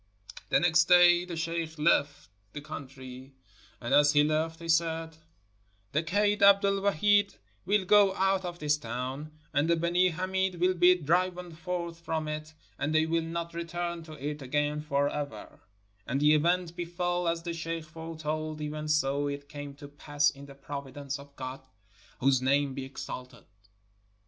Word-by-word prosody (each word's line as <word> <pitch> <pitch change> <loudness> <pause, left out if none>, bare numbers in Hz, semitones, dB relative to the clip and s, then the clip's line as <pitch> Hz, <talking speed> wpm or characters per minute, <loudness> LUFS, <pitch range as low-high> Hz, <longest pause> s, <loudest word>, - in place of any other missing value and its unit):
The - - +4
next 165 -2 +4
day 175 0 +6
the 175 -2 -6
sheikh 165 -1 -3
left 150 - +1 0.2
the 150 - -5
country; 135 -3 -9 0.4
and 120 +2 -3
as 145 +1 +6
he 145 0 +5
left 160 +2 0
he 170 - -8
said: 165 -1 0 0.8
"The 155 - +1
Kaid 205 +5 +1
Abd 200 0 +7
el 200 0 +1
Wahid 205 +2 +3 0.3
will 205 -1 +2
go 200 0 +5
out 195 0 +1
of 175 -1 -5
this 150 -2 0
town, 130 +4 -5 0.2
and 145 +4 +2
the 170 - +4
Benee 175 +2 +2
Hameed 190 +2 -1
will 180 +2 +2
be 180 0 +5
driven 180 +2 0
forth 170 0 -5
from 160 -2 -3
it, 155 +1 -6 0.2
and 155 +2 -1
they 155 0 +4
will 165 +1 +1
not 170 +1 -4
return 170 0 -4
to 155 - -10
it 150 0 -5
again 145 +3 -1
forever"; 145 -5 -3 0.2
— 105 0 -39
and 135 +3 0
the 150 +1 +5
event 170 +2 +1
befell 175 0 -2
as 165 0 -1
the 170 -1 -3
sheikh 165 0 -4
foretold, 155 -1 -5
even 150 0 -4
so 145 -2 +1
it 140 0 -5
came 145 -1 -8
to 145 0 -11
pass 145 0 0
in 140 0 -12
the 140 - -12
providence 140 0 -6
of 140 0 -14
God 130 0 -6 0.3
— - - -28
whose 130 -1 +3
name 140 +1 +2
be 130 0 -5
exalted. 125 -3 -8
155 Hz, 170 wpm, -29 LUFS, 145-175 Hz, 0.8 s, Abd